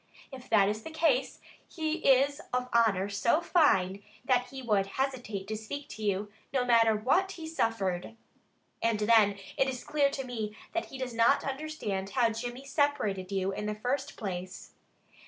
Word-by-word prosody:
If 260 -2 -10
that 205 -3 +5
is 210 +1 -2
the 320 - -8
case, 315 -5 +1 0.3
he 315 -1 -2
is 280 0 +3
of 250 0 -1
honor 215 -5 +3
so 205 +8 +2
fine, 200 - +3 0.2
that 250 -2 +2
he 265 +1 -8
would 205 -4 +2
hesitate 245 -8 -2
to 215 - -3
speak 280 +7 -6
to 220 - -9
you, 205 0 -1 0.2
no 255 -2 +1
matter 230 -2 +5
what 350 - +1
he 330 -4 -8
suffered. 225 - -1 0.7
And 230 -2 +1
then 210 -2 +5 0.2
it 270 - +3
is 255 -2 -5
clear 290 -2 +2
to 275 -1 -4
me 220 -4 -4 0.2
that 340 - -1
he 270 - -9
does 260 -2 -4
not 230 +4 +4
understand 270 -9 -3
how 235 0 +2
Jimmy 245 +4 -6
separated 270 - 0
you 195 0 0
in 210 +2 -4
the 210 - -2
first 260 +6 -3
place." 185 -3 -6
235 Hz, 175 wpm, -30 LUFS, 210-275 Hz, 0.7 s, that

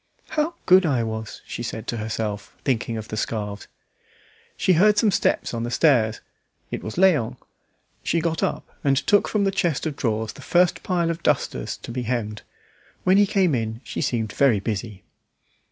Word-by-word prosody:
"How 315 +2 -1
good 185 +1 +7
I 135 -8 +1
was!" 110 -1 -5
she - - -6
said 110 -1 -5
to 120 - -3
herself, 105 -2 -4
thinking 115 -3 0
of 110 -1 -7
the 110 - -4
scarves. 105 -2 -3 0.9
She 185 - +3
heard 210 +5 +5
some 210 0 +4
steps - - +1
on 115 - -2
the 120 - -2
stairs. 120 -4 +3 0.5
It - - -3
was 110 - -5
Léon. 150 -10 +3 0.6
She 170 - 0
got 165 -1 -1
up - - -1 0.2
and 135 -1 +3
took 205 +8 +3
from 210 -2 +1
the 195 - +2
chest 170 -7 0
of 155 -3 -2
drawers 110 -3 -1
the - - -13
first 175 +5 +2
pile 175 -3 0
of 165 - -5
dusters - - 0
to - - -9
be 125 +1 -3
hemmed. 110 -3 -2 0.6
When 185 +1 +4
he 205 0 +5
came 190 -5 +2
in 110 -2 -2
she - - -4
seemed 110 -3 -1
very 130 -7 +4
busy. 105 -1 -4
125 Hz, 185 wpm, -24 LUFS, 110-175 Hz, 0.9 s, good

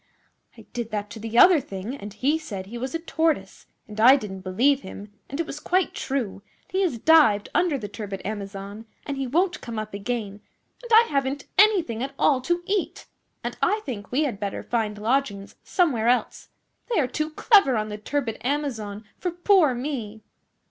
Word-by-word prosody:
'I - - -13
did 235 -2 -4
that 210 -1 -4
to 225 - -8
the 225 +1 -4
other 350 +4 +8
thing; 205 0 -6
and 205 -6 -8
he 275 +9 0
said 200 -12 -6
he 230 +5 -8
was 260 +6 -4
a - - +2
Tortoise, 325 -1 -1 0.2
and 215 -1 -9
I 255 +4 +9
didn't 205 -8 -5
believe 250 +10 +2
him, 200 +2 -10 0.2
and 280 - -5
it 335 - 0
was 295 - -7
quite 360 +1 +1
true, 240 -8 -3 0.2
and - - -31
he 380 - +1
has 345 -11 0
dived 230 -7 +5
under 340 -5 +2
the 215 -5 -6
turbid 205 -1 -6
Amazon, 200 +1 -6 0.2
and 285 - -3
he 270 -1 -3
won't 350 +7 +1
come 230 -3 -6
up 215 -1 -5
again, 205 -1 -4 0.4
and 480 -1 -11
I 450 +1 +8
haven't 275 0 -1
anything 375 - +4
at 275 +1 -4
all 265 -3 +3
to 345 +6 -1
eat, 395 -1 -2 0.4
and - - -4
I 425 +1 +2
think 215 -7 -6
we 275 +5 +2
had 240 -9 -2
better 200 -2 -4
find 220 -3 -1
lodgings 215 -3 -1
somewhere 275 - +1
else. 245 +1 0 0.4
They 455 - +2
are 285 - +3
too 305 +5 -2
clever 310 - +4
on 215 0 -2
the 210 0 -6
turbid 245 0 -2
Amazon 235 -7 -3
for 360 - -1
poor 350 -5 +3
me! 240 -5 -5
250 Hz, 195 wpm, -25 LUFS, 210-305 Hz, 0.4 s, I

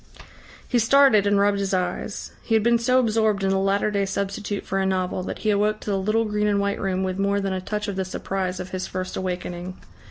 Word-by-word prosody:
He 245 - +2
started 230 -3 +5
and 205 0 +3
rubbed 200 0 +2
his 195 -1 0
eyes. 180 +3 -3
He 225 - 0
had 220 - +3
been 235 0 +4
so 250 +2 +2
absorbed 220 -4 +1
in 190 - +2
the 195 - +2
latter 195 +2 +1
day 200 -1 0
substitute 200 +1 -3
for 195 - -1
a 190 - +1
novel, 185 -1 -1
that 185 - -5
he 215 - +4
awoke 210 +1 +1
to 210 - -3
the 195 - +1
little 215 +4 +1
green 210 0 0
and 205 -1 +2
white 200 0 -1
room 190 -1 -1
with 185 0 -2
more 200 0 +1
than 195 -1 -2
a 185 - -3
touch 210 +2 -3
of 200 - -3
the 190 - 0
surprise 185 0 -3
of 180 - -6
his 185 0 -3
first 185 0 -4
awakening. 180 0 -4
200 Hz, 245 wpm, -24 LUFS, 190-210 Hz, -, started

